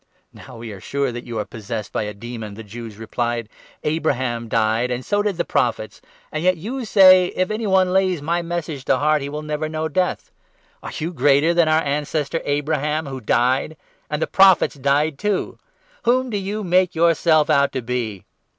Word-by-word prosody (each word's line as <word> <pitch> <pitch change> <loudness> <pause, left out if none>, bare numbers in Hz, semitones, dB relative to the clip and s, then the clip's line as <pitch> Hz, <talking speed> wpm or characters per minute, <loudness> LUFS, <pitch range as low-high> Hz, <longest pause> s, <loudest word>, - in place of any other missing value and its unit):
" - - -45
Now 125 -1 -12
we 115 -1 -7
are 100 - -9
sure 140 +2 -1
that 120 0 -7
you 115 -2 -5
are 105 - -2
possessed 105 0 -6
by - - -1
a 105 - -5
demon," 110 -1 -7
the 115 - -9
52 105 0 -15
Jews 115 -3 -8
replied. 115 +1 -3 0.4
"Abraham 130 -7 -1
died, 115 +2 +1
and 125 0 -3
so 205 0 +1
did 205 -4 -1
the 170 - -1
Prophets; 115 -3 -1 0.3
and 155 +1 -3
yet 185 0 +3
you 240 +9 -5
say 185 -3 +7
' - - -10
If 185 +2 0
any 215 0 -2
one 190 -1 +3
lays 190 -3 +2
my 170 +4 -1
Message 165 -5 -4
to - - +3
heart, 150 0 +2
he 140 - -4
will 150 +1 -5
never 155 0 -3
know 155 0 -2
death.' 180 +4 -1 0.5
Are - - -7
you 165 +3 -3
greater 145 +2 +3
than 170 -2 +3
our 155 +1 +3
ancestor 145 +2 -2
Abraham, 150 +1 -1
53 140 - -8
who 130 - -6
died? 125 +7 +1 0.3
And 150 - -2
the - - +1
Prophets 190 -3 +5
died 140 +1 0
too. 210 -2 -2 0.4
Whom 255 +1 +1
do 210 - -1
you 200 +2 -3
make 180 -1 +2
yourself 160 -2 +3
out 140 -1 +3
to 130 - -3
be 115 -5 -3
150 Hz, 205 wpm, -21 LUFS, 120-175 Hz, 0.5 s, say